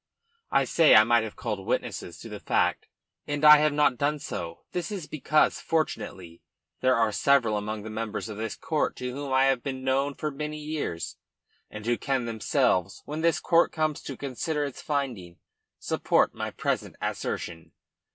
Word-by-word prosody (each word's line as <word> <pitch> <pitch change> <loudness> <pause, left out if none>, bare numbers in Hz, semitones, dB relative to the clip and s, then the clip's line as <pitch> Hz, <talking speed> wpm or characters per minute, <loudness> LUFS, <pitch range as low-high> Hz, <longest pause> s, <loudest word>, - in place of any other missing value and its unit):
I - - +3
say - - +5
I - - +9
might - - +4
have - - -6
called - - -4
witnesses - - -3
to - - -9
that - - -8
fact - - +1 0.4
and 145 0 -1
I 150 0 +11
have 150 0 +3
not 145 -4 +2
done 145 +1 +1
so. 85 - -6
This 180 +3 -3
is 190 -6 -4
because, 155 0 +2
fortunately, 95 - -3 0.4
there 130 0 +3
are 115 -2 +2
several 120 -1 +3
among 105 0 -3
the 110 - -7
members 110 0 -4
of 105 -2 -7
this 110 0 -3
court 155 -2 -1
to 125 0 -4
whom 140 0 -5
I 130 0 +4
have 135 -2 +2
been 130 -1 -5
known 135 +2 +1
for 150 - -3
many 150 +2 -5
years, 150 - -4 0.5
and 105 0 -9
who 120 0 +1
can 135 -3 -1
themselves, 110 -5 0
when 150 +2 -4
this 165 0 +2
court 170 0 +3
comes 155 -2 -1
to 135 - -7
consider 145 +3 -2
its 140 - -7
finding, 125 - -3 0.4
support - - +1
my - - -4
present - - -2
assertion. 80 -1 -4
135 Hz, 180 wpm, -27 LUFS, 110-150 Hz, 0.5 s, I